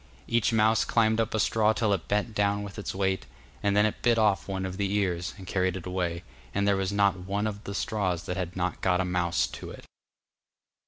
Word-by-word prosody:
Each 115 Hz, -1 st, +2 dB
mouse 110 Hz, 0 st, +4 dB
climbed 110 Hz, -1 st, +2 dB
up 110 Hz, 0 st, -2 dB
a -, -, +1 dB
straw 110 Hz, +1 st, +3 dB
till 110 Hz, -2 st, +1 dB
it 95 Hz, -, -3 dB
bent 105 Hz, +2 st, 0 dB
down 100 Hz, 0 st, +1 dB
with 100 Hz, +1 st, -8 dB
its 100 Hz, -, -4 dB
weight, 95 Hz, -1 st, 0 dB, 0.3 s
and 100 Hz, 0 st, +2 dB
then 105 Hz, -, +5 dB
it 110 Hz, -, -2 dB
bit 120 Hz, -1 st, +3 dB
off 105 Hz, -3 st, +2 dB
one 95 Hz, -1 st, -2 dB
of 95 Hz, 0 st, -5 dB
the 100 Hz, -1 st, -1 dB
ears, 90 Hz, -4 st, -1 dB
and 95 Hz, -, -10 dB
carried 95 Hz, 0 st, 0 dB
it 90 Hz, -, -8 dB
away, 90 Hz, -2 st, -2 dB, 0.3 s
and 100 Hz, 0 st, +1 dB
there 100 Hz, -, +4 dB
was 95 Hz, 0 st, -1 dB
not 100 Hz, -2 st, +2 dB
one 100 Hz, +3 st, -2 dB
of 105 Hz, 0 st, -4 dB
the 100 Hz, -, -5 dB
straws 95 Hz, -7 st, -1 dB
that 90 Hz, -, -4 dB
had 90 Hz, -2 st, -4 dB
not 90 Hz, 0 st, -2 dB
got 90 Hz, -1 st, +2 dB
a 95 Hz, -, +1 dB
mouse 90 Hz, -1 st, +1 dB
to -, -, -8 dB
it. -, -, -11 dB
100 Hz, 230 wpm, -28 LUFS, 95-105 Hz, 0.3 s, then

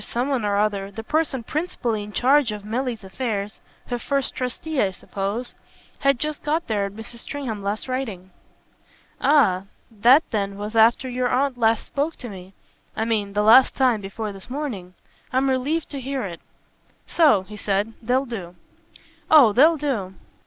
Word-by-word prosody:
Someone 250 Hz, +2 st, -1 dB
or 205 Hz, -1 st, +1 dB
other, 200 Hz, -2 st, 0 dB
the 215 Hz, +3 st, -8 dB
person 295 Hz, -2 st, -1 dB
principally 245 Hz, -7 st, -2 dB
in 205 Hz, 0 st, -8 dB
charge 265 Hz, +2 st, +3 dB
of 210 Hz, -1 st, -7 dB
Milly's 235 Hz, 0 st, -3 dB
affairs 205 Hz, 0 st, -4 dB, 0.3 s
her 245 Hz, -1 st, -3 dB
first 275 Hz, +2 st, -1 dB
trustee, 260 Hz, +4 st, -2 dB
I 200 Hz, -, +2 dB
suppose 200 Hz, +5 st, -4 dB, 0.5 s
had 275 Hz, -1 st, +3 dB
just 305 Hz, +2 st, -3 dB
got 310 Hz, +3 st, -1 dB
there 205 Hz, -3 st, 0 dB
at 200 Hz, -, -10 dB
Mrs. 225 Hz, +2 st, -8 dB
Stringham's 245 Hz, -6 st, -5 dB
last 205 Hz, +4 st, -3 dB
writing." 220 Hz, -8 st, -4 dB, 0.9 s
"Ah 195 Hz, -11 st, +4 dB, 0.3 s
that 240 Hz, +8 st, +5 dB
then 200 Hz, -2 st, -2 dB
was 210 Hz, +2 st, -6 dB
after 230 Hz, +3 st, +4 dB
your 250 Hz, 0 st, -1 dB
aunt 275 Hz, 0 st, +1 dB
last 225 Hz, -2 st, +2 dB
spoke 295 Hz, +3 st, -2 dB
to 245 Hz, -, -8 dB
me 190 Hz, -1 st, -11 dB, 0.4 s
I 220 Hz, -, -1 dB
mean 210 Hz, -3 st, -1 dB
the 210 Hz, +1 st, +1 dB
last 240 Hz, +5 st, +7 dB
time 250 Hz, -5 st, +2 dB
before 205 Hz, +2 st, -5 dB
this 195 Hz, +2 st, -11 dB
morning. 235 Hz, -11 st, -5 dB, 0.4 s
I'm 265 Hz, +1 st, +2 dB
relieved 285 Hz, +6 st, -1 dB
to 280 Hz, -2 st, -5 dB
hear 270 Hz, 0 st, -3 dB
it. 175 Hz, -4 st, -6 dB, 0.6 s
So," 290 Hz, -, +4 dB
he 210 Hz, +3 st, -11 dB
said, 205 Hz, +2 st, -1 dB
"they'll 250 Hz, +4 st, +1 dB
do." 190 Hz, -8 st, -7 dB, 0.7 s
"Oh 275 Hz, -9 st, +7 dB
they'll 315 Hz, +7 st, +5 dB
do." 230 Hz, -11 st, -2 dB
230 Hz, 165 wpm, -23 LUFS, 205-270 Hz, 0.9 s, last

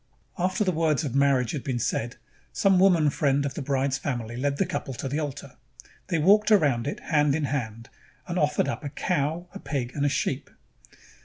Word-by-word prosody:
After 185 Hz, +3 st, +1 dB
the 185 Hz, -, +1 dB
words 160 Hz, -2 st, +1 dB
of 135 Hz, -6 st, -3 dB
marriage 135 Hz, -4 st, +2 dB
had 145 Hz, -, -4 dB
been 130 Hz, -3 st, -2 dB
said, 120 Hz, +1 st, -2 dB, 0.4 s
some 195 Hz, -2 st, +3 dB
woman 175 Hz, -6 st, +4 dB
friend 140 Hz, 0 st, +1 dB
of 140 Hz, -, -3 dB
the -, -, -5 dB
bride's 135 Hz, -1 st, 0 dB
family 120 Hz, -5 st, -4 dB
led 140 Hz, +3 st, -1 dB
the 195 Hz, -, +2 dB
couple 150 Hz, -7 st, -4 dB
to 135 Hz, -, -4 dB
the 140 Hz, +4 st, -2 dB
altar. 140 Hz, -3 st, -6 dB, 0.5 s
They 170 Hz, -, 0 dB
walked 205 Hz, +7 st, +4 dB
around 145 Hz, -, +3 dB
it -, -, -3 dB
hand 150 Hz, -2 st, +2 dB
in 160 Hz, -, -1 dB
hand 115 Hz, -5 st, -3 dB, 0.4 s
and 175 Hz, 0 st, -2 dB
offered 150 Hz, -2 st, +1 dB
up 140 Hz, -, -4 dB
a 145 Hz, -, -3 dB
cow, 160 Hz, +2 st, -1 dB
a 200 Hz, -, -7 dB
pig, 130 Hz, -8 st, -3 dB
and 145 Hz, -, -2 dB
a 145 Hz, -, +3 dB
sheep. 135 Hz, 0 st, -2 dB
145 Hz, 205 wpm, -26 LUFS, 135-160 Hz, 0.5 s, woman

